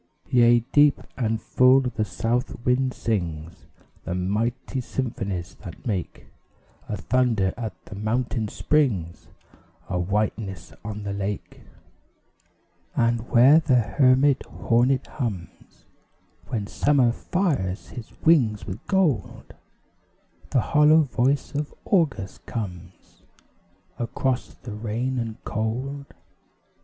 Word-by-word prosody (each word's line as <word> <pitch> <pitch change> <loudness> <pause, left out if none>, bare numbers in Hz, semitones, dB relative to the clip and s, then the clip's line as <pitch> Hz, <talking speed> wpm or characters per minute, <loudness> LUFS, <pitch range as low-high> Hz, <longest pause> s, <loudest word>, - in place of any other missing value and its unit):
Yea, 120 -1 +5
deep 145 -1 +5 0.2
and 115 -3 -1
full 130 +4 +5
the 125 -4 -1
South 120 +3 -2
Wind 130 +1 +2
sings 85 -9 -4 0.4
The 90 - -3
mighty 110 +8 -1
symphonies 100 -8 -4
that 90 -5 -10
make 100 -7 -3 0.6
A 105 - -2
thunder 110 -2 +1
at 110 -6 -5
the - - -10
mountain 110 +2 -1
springs 105 - 0 0.6
A 90 -2 -1
whiteness 100 -1 -2
on 105 0 -6
the 100 -1 -3
lake. 100 0 -5 1.3
And 115 0 +1
where 130 +6 +7
the 150 -5 +2
hermit 130 +3 +3
hornet 125 +3 +1
hums, 105 - -6 0.6
When 110 -4 -2
Summer 130 +2 +2
fires 130 - -1
his 115 -3 -9
wings 125 -11 +3
with 95 +4 -7
gold, 185 - 0 1.0
The 130 - +2
hollow 150 +5 +5
voice 130 +1 0
of 145 +1 -3
August 150 - 0
comes, 90 -5 -7 0.8
Across 125 +1 -2
the 120 - -7
rain 115 +4 -2
and 115 -2 -3
cold. 130 +6 -3
115 Hz, 105 wpm, -24 LUFS, 105-130 Hz, 1.3 s, where